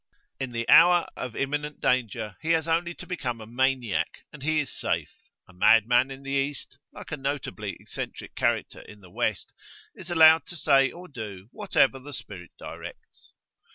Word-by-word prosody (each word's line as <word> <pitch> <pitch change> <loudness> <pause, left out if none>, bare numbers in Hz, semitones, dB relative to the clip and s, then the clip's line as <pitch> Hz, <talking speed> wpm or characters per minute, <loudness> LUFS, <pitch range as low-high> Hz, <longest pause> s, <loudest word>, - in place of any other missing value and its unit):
In 130 -2 -3
the 115 0 -3
hour 175 0 +7
of 125 -3 -6
imminent 145 +2 -2
danger, 115 -4 0
he 165 +1 +1
has 160 0 +1
only 170 +1 0
to - - -10
become 125 -10 -4
a 110 - -9
maniac, 125 -1 -1
and 150 - -11
he 155 +2 +1
is 145 - -2
safe; - - -2 0.3
a 90 - -18
madman 115 +7 +4
in 135 0 -9
the 135 - -6
East, 140 -1 -2
like - - -11
a 150 - -2
notably 140 +1 -4
eccentric - - -7
character - - -1
in 105 -1 -14
the 90 -2 -16
West, - - -2 0.4
is 185 -1 -10
allowed 160 -1 +6
to 175 - -6
say 135 -4 +4
or 180 +7 -11
do 105 - -8
whatever 135 0 +2
the 145 +2 -10
spirit 100 -8 -9
directs. - - -11
135 Hz, 175 wpm, -26 LUFS, 115-155 Hz, 0.4 s, hour